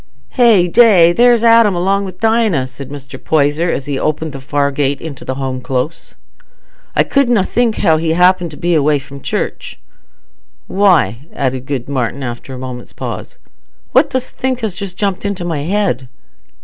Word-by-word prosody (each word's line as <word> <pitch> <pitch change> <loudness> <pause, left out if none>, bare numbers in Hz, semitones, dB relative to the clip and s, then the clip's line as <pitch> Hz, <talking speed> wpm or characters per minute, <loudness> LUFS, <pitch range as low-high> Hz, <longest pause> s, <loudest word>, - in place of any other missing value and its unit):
"Hey 225 -8 +4
day! 180 -5 +5
There's 240 +2 +4
Adam 230 -4 +5
along 195 +3 0
wi' 190 - -7
Dinah," 220 - +2
said 130 +1 -10
Mr. 140 -2 -10
Poyser, 155 +2 +1
as 140 - -2
he 140 -2 -3
opened 155 +1 -2
the 135 - -8
far 140 +1 -1
gate 140 0 -1
into 150 -5 -8
the 130 - -4
Home 130 -1 -4
Close. 130 +6 -4 0.8
"I - - +4
couldna 245 -7 +2
think 230 +2 0
how 160 -1 +3
he 160 0 0
happened 180 -2 +2
away 150 -4 +3
from 140 0 -11
church. - - -4 0.9
Why," 160 - +2
added 130 -2 -2
good 135 -4 -3
Martin, 135 -1 -2
after 120 +1 -6
a 130 - -6
moment's 125 -1 -8
pause, - - -7 0.5
"what - - +4
dost 260 -1 -3
think 260 -1 -2
has 220 -4 -2
just 185 -1 -7
jumped 200 -2 -1
into 200 -3 -3
my 165 -4 -2
head?" 170 -5 -1
160 Hz, 165 wpm, -15 LUFS, 140-200 Hz, 0.9 s, day